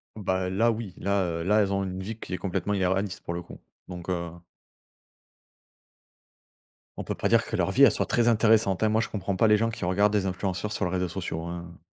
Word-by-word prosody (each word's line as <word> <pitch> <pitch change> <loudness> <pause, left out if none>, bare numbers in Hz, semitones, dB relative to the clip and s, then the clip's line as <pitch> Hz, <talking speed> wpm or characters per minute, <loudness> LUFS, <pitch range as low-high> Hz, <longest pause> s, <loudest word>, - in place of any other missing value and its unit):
Bah 95 -3 -1
là 115 +5 +2
oui. 110 -4 -5
Là, 100 0 0
heu, 85 -1 -2
là 105 +4 +3
elles 100 -1 0
ont 100 - 0
une 95 0 -4
vie 110 +2 -5
qui - - -7
est 90 - -1
complètement 100 +1 -2
irréaliste, 95 0 0
pour 85 - -4
le 85 - -4
coup. - - -12 0.3
Donc, 90 -1 -8
heu 85 -2 -2 2.7
On - - -4
peut - - -3
pas - - -1
dire 115 0 +4
que - - -4
leur 90 -3 +1
vie, 140 - +4
elle 130 - +8
soit - - -1
très 120 -1 +2
intéressante, 110 -4 +3
hein. 110 - +4
Moi, 110 +1 +2
je 115 - -3
comprends 100 -2 -3
pas 110 - +3
les 105 0 +5
gens 115 +2 +1
qui 115 -5 -5
regardent 100 +3 +2
des 100 -2 +1
influenceurs 95 +2 -2
sur 105 -2 -1
les 90 - -2
réseaux 90 0 0
sociaux, 85 -3 -4
hein. 85 0 -7
95 Hz, 230 wpm, -27 LUFS, 90-105 Hz, 2.7 s, elle